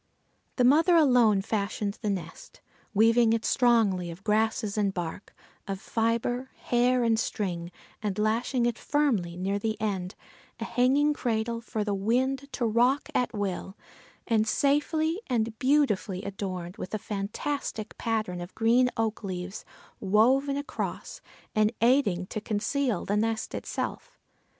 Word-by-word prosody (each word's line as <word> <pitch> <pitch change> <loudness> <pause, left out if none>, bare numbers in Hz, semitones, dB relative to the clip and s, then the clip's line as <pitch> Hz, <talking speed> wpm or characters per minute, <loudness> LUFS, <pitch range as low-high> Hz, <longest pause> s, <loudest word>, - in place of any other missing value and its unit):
The 250 - +2
mother 315 +7 +5
alone 245 -10 +5
fashioned 200 0 -2
the 215 - -1
nest, 175 -5 -6 0.3
weaving 225 +2 +4
it 225 -1 -1
strongly 220 -8 +3
of 170 +3 -9
grasses 215 -1 +1
and 205 -2 +1
bark, 175 +1 -5 0.4
of 195 -1 -3
fibre, 235 +4 -1
hair 245 +1 +2
and 225 -1 +2
string, 175 -6 -3 0.3
and 205 -3 -2
lashing 230 +4 +1
it 240 -1 -1
firmly 225 -13 0
near 195 +2 -1
the 220 +1 -2
end, 195 -3 -2 0.4
a - - -3
hanging 275 +4 +2
cradle 230 -3 -1
for 220 -2 -3
the 205 -1 -1
wind 260 +7 0
to 240 - -1
rock 245 +5 +2
at 250 - +1
will 195 -1 -3 0.5
and 220 -2 +2
safely, 305 - +1
and 225 -3 -1
beautifully 235 -9 +1
adorned 190 -2 -5
with 190 - -5
a - - 0
fantastic 215 +3 -4
pattern 215 -6 -1
of 175 +2 -9
green 240 +3 +4
oak 225 -1 -1
leaves, 185 0 -5 0.4
woven 255 +8 +3
across, 285 +2 -5 0.3
and 215 0 +3
aiding 230 -7 +3
to 215 +3 -5
conceal 235 +4 -1
the 205 - 0
nest 225 +1 -1
itself. - - -5
220 Hz, 140 wpm, -28 LUFS, 200-250 Hz, 0.5 s, mother